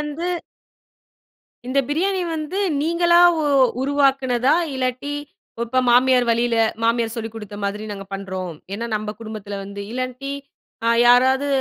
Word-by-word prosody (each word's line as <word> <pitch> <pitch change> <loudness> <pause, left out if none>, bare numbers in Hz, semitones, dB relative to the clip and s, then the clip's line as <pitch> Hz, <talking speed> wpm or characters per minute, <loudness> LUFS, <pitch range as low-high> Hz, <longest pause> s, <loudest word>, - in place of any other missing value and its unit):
வந்து 300 +3 -4 1.4
இந்த 260 +2 0
பிரியாணி 370 +5 0
வந்து 310 +5 -4 0.2
நீங்களா 345 +1 +3 0.2
உ - - 0 0.4
உருவாக்குனதா, 270 -2 +2 0.2
இல்லாட்டி, 255 +2 -2 0.5
இப்போ 255 +2 +1
மாமியார் 250 0 +4
வழியில 235 0 +1 0.3
மாமியார் 230 -1 +1
சொல்லிக் 225 -1 -5
குடுத்த 210 -2 -8
மாதிரி 210 +2 -3
நாங்க 195 -1 -7
பண்றோம். 185 -3 -5 0.2
ஏன்னா, 230 +3 -4
நம்ப 210 0 -4
குடும்பத்தில 210 -2 -6
வந்து 200 0 -7
இல்லாட்டி 255 +2 -4 0.5
அ - - +4 0.2
யாராவது 260 +3 +5
250 Hz, 125 wpm, -21 LUFS, 220-280 Hz, 1.4 s, யாராவது